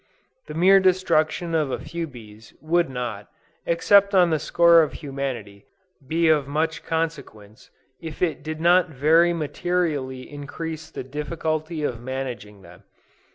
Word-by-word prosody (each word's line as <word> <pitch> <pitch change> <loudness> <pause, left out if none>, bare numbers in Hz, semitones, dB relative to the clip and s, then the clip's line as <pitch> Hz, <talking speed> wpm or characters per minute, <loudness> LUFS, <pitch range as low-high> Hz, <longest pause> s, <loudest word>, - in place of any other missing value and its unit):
The 150 - -8
mere 190 +4 +6
destruction 175 -3 +1
of 155 -4 +1
a - - -2
few 170 -1 -5
bees, 110 -5 -14
would 170 +1 +1
not, 120 -5 -5 0.4
except 200 +4 +4
on 175 -2 +5
the 155 - +1
score 170 +2 +5
of 155 - -1
humanity, 130 -8 -6 0.4
be 165 +3 +1
of 150 -3 +3
much 155 +3 -2
consequence, 140 -11 -5 0.3
if 160 -2 -8
it 165 -3 -1
did 155 +1 -6
not 175 +1 +4
very 160 +4 +3
materially 155 -5 -2
increase 155 +2 -7
the - - -7
difficulty 155 +3 -4
of 120 -5 -3
managing 120 -6 -6
them. - - -15
155 Hz, 140 wpm, -23 LUFS, 130-170 Hz, 0.4 s, mere